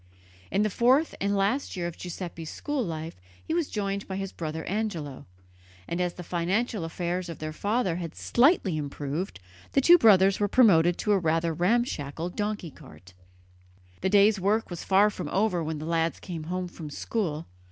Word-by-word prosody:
In 200 Hz, -, +1 dB
the 215 Hz, -, 0 dB
fourth 260 Hz, -, +3 dB
and 200 Hz, +1 st, +1 dB
last 210 Hz, +8 st, 0 dB
year 175 Hz, -, -2 dB
of 170 Hz, -1 st, -4 dB
Giuseppe's 170 Hz, -2 st, -6 dB
school 290 Hz, -3 st, -2 dB
life 160 Hz, -, -6 dB, 0.2 s
he -, -, -2 dB
was 335 Hz, -3 st, 0 dB
joined 200 Hz, -1 st, -3 dB
by 190 Hz, -, -4 dB
his 195 Hz, 0 st, -4 dB
brother 160 Hz, -1 st, -5 dB
Angelo, 175 Hz, -10 st, -3 dB, 0.6 s
and 170 Hz, +1 st, -2 dB
as 175 Hz, -1 st, -1 dB
the 180 Hz, -, -7 dB
financial 185 Hz, +5 st, -1 dB
affairs 175 Hz, +2 st, -3 dB
of 165 Hz, -, -6 dB
their 155 Hz, 0 st, -5 dB
father 200 Hz, 0 st, 0 dB
had 170 Hz, -3 st, -6 dB
slightly 240 Hz, -, +3 dB
improved, 145 Hz, -, -4 dB, 0.3 s
the -, -, +4 dB
two 345 Hz, +5 st, +7 dB
brothers 195 Hz, -4 st, +5 dB
were 205 Hz, -, +2 dB
promoted 175 Hz, -7 st, +5 dB
to 210 Hz, -, 0 dB
a 200 Hz, -, +4 dB
rather 165 Hz, 0 st, +1 dB
ramshackle 175 Hz, -, 0 dB
donkey 205 Hz, -4 st, -3 dB
cart. 90 Hz, -, -15 dB, 0.9 s
The 190 Hz, -, +1 dB
day's 205 Hz, +1 st, +5 dB
work 205 Hz, +2 st, +1 dB
was 175 Hz, -, -5 dB
far 200 Hz, +2 st, +4 dB
from -, -, -5 dB
over 190 Hz, -4 st, +1 dB
when 160 Hz, 0 st, -3 dB
the 155 Hz, -, -6 dB
lads 165 Hz, 0 st, 0 dB
came 165 Hz, -4 st, -6 dB
home 180 Hz, +2 st, -3 dB
from 165 Hz, -3 st, -9 dB
school. 160 Hz, -1 st, -3 dB
180 Hz, 180 wpm, -27 LUFS, 165-210 Hz, 0.9 s, two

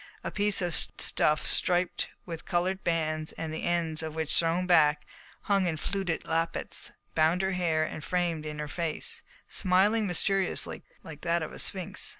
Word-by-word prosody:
A -, -, -3 dB
piece 205 Hz, -2 st, +2 dB
of 175 Hz, -1 st, -1 dB
stuff 150 Hz, 0 st, +2 dB
striped 180 Hz, 0 st, +1 dB, 0.2 s
with 165 Hz, -2 st, -6 dB
coloured 185 Hz, +1 st, -1 dB
bands, 155 Hz, -2 st, 0 dB
the 160 Hz, -1 st, -4 dB
ends 165 Hz, -2 st, +1 dB
of 160 Hz, -1 st, -5 dB
which, 160 Hz, -1 st, -1 dB
thrown 170 Hz, +2 st, +2 dB
back, 150 Hz, -4 st, +4 dB, 0.4 s
hung 195 Hz, -2 st, +2 dB
in 160 Hz, -2 st, -1 dB
fluted 190 Hz, 0 st, -2 dB
lappets, 165 Hz, 0 st, -2 dB, 0.2 s
bound 160 Hz, +4 st, +3 dB
her 190 Hz, -, +1 dB
hair 170 Hz, -4 st, +1 dB
and 155 Hz, 0 st, -5 dB
framed 175 Hz, -3 st, -1 dB
in 150 Hz, -1 st, -5 dB
her 150 Hz, 0 st, -4 dB
face, 165 Hz, 0 st, -2 dB, 0.3 s
smiling 205 Hz, +4 st, +2 dB
mysteriously 195 Hz, +1 st, 0 dB, 0.2 s
like 155 Hz, -2 st, -10 dB
that 170 Hz, -1 st, +1 dB
of 155 Hz, -, -6 dB
a -, -, -6 dB
sphinx. 185 Hz, -2 st, +2 dB
170 Hz, 160 wpm, -29 LUFS, 155-180 Hz, 0.4 s, back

